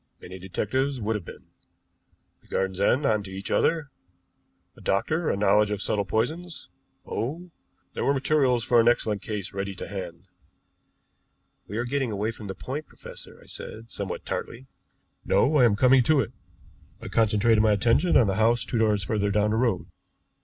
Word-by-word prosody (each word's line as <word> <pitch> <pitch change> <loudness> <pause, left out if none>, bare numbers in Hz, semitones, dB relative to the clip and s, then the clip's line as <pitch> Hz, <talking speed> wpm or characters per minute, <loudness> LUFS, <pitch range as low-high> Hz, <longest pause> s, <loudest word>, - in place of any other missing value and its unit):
Many 95 +1 -10
detectives 130 +9 -2
would 110 0 -1
have 100 -5 -5
been. - - -11 1.0
The - - -26
gardens 95 -1 -2
end 125 +8 +2
on 110 -4 +2
to 100 - -9
each 95 +1 -6
other 160 -4 +1 0.8
a - - -16
doctor, 155 - 0
a - - 0
knowledge 105 +1 +3
of 105 -1 -2
subtle 100 -1 0
poisons 160 - -3 0.4
oh, 170 +9 -4 0.4
there - - -3
were - - +3
materials 135 -4 +2
for 120 -1 +4
an 115 - +4
excellent 110 -4 +2
case 105 -1 -5
ready 100 0 -4
to - - -7
hand." 90 -3 -7 1.4
"We 105 - -5
are 120 - -1
getting 135 0 -1
away 105 +2 -1
from 110 -2 -10
the 95 - -5
point, 140 +10 -6
professor," - - -11
I - - -20
said, 115 +1 -8
somewhat 100 -3 -5
tartly. 125 +3 -5 0.6
"No, 150 +3 +3
I 125 - +6
am 110 -4 +4
coming 130 +4 +5
to 155 -2 +4
it. 125 - -1 0.7
I - - -8
concentrated 110 0 +3
my 110 -1 +4
attention 120 - +3
on 120 - +5
the 95 -1 -1
house 115 +2 +3
two 115 - -2
doors 105 -3 +2
further 100 +1 0
down 105 +1 +2
the 110 - +1
road. 120 -1 +1
110 Hz, 180 wpm, -26 LUFS, 100-130 Hz, 1.4 s, I